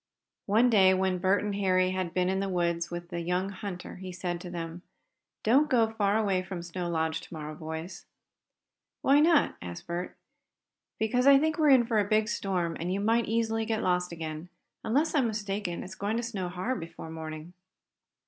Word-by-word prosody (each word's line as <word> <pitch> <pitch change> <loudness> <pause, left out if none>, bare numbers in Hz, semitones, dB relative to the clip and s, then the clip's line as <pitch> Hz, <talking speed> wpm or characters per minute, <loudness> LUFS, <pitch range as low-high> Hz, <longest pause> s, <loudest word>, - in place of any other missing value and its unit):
One 230 +5 +4
day, 190 -3 +6
when 185 -1 0
Bert 190 +3 +2
and 205 -1 -2
Harry 185 -2 +2
had 185 -2 -2
been 180 +1 +1
in 190 +1 0
the 195 0 -1
woods 170 -2 0
with 175 0 -6
the 175 -2 -4
young 180 +3 -1
hunter, 190 -2 -7
he 185 0 -7
said 175 -1 -4
to 180 - -7
them: 170 0 -6 0.6
"Don't 275 +7 +4
go 225 -3 +3
far 210 -1 +1
away 200 -4 +1
from 185 -2 -6
Snow 175 0 -4
Lodge 160 -1 -1
to - - -14
morrow, 155 -2 -6
boys." 160 +3 -7 1.0
"Why 280 +2 +5
not?" 315 -1 +4
asked 85 -1 -7
Bert. 175 +1 -4 0.8
"Because 245 +4 +1
I 280 0 +9
think 315 +3 0
we're 305 -2 +5
in 260 -3 +6
for 225 -2 +1
a - - +4
big 215 +2 +1
storm, 180 -5 -1
and 170 +3 -2
you 195 - 0
might 225 +3 +2
easily 225 0 0
get 220 0 -1
lost 180 -1 +1
again. 160 0 -6 0.3
Unless 285 +8 +1
I'm 275 -6 +3
mistaken, 205 -4 -3
it's 190 - -8
going 205 +4 -2
to 235 - -2
snow 200 -6 -3
hard 185 +9 -2
before 165 -1 -8
morning." 160 +1 -7
190 Hz, 195 wpm, -29 LUFS, 175-220 Hz, 1.0 s, I